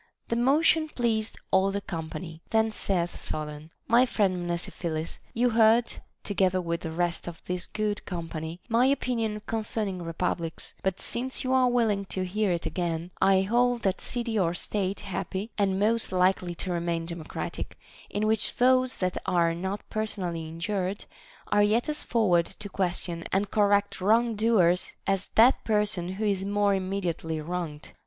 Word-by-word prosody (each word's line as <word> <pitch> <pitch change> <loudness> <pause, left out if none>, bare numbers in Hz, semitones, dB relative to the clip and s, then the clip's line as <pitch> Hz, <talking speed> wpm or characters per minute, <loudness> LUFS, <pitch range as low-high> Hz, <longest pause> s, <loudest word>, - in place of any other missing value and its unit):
The 230 - +1
motion 310 +6 +3
pleased 225 -5 -1
all 190 +1 +4
the 200 +1 -1
company; 165 -2 -6
then 220 0 +2
saith 180 -5 -1
Solon: 150 0 -5 0.2
My 240 +3 +5
friend 185 -6 0
Mnesiphilus, 170 -1 -3 0.2
you 245 +1 +3
heard, 225 +1 +4 0.3
together 185 -2 +1
with 170 -1 -2
the 165 - -4
rest 170 +1 -1
of 170 -1 -6
this 180 0 -3
good 210 -1 -2
company, 165 -1 -5
my 240 +2 +4
opinion 230 -6 0
concerning 215 -4 -2
republics; 165 0 -3
but 190 -1 -1
since 260 +2 -1
you 260 0 0
are 255 -1 +4
willing 220 -5 +1
to 185 -1 -2
hear 205 +2 0
it 170 -1 -2
again, 170 -1 -2
I 195 -1 +5
hold 240 +4 +2
that 190 -2 0
city 235 -3 -2
or 170 -2 +1
state 195 +1 -2
happy 195 +3 -4
and 195 -2 +1
most 225 +2 +2
likely 180 -1 +2
to 185 - -3
remain 170 -1 -1
democratic, 170 -2 -5 0.3
in 205 +1 -1
which 220 0 +1
those 255 +1 +3
that 185 -1 -1
are 170 -2 +3
not 190 +4 -4
person 215 -2 -2
ally 170 -2 -2
injured 180 +4 -3 0.5
are 205 - +5
yet 215 +5 +3
as 300 0 -2
forward 180 -8 +2
to 205 +1 -8
question 175 -3 -2
and 195 +1 0
correct 205 -2 +2
wrong 230 +4 +3
doers 205 -5 +3
as 195 0 0
that 240 +4 +6
person 205 -5 0
who 210 +3 -2
is 195 -2 +1
more 205 0 +2
immediately 185 -4 -2
wronged. 160 -2 -5
195 Hz, 160 wpm, -27 LUFS, 175-220 Hz, 0.5 s, that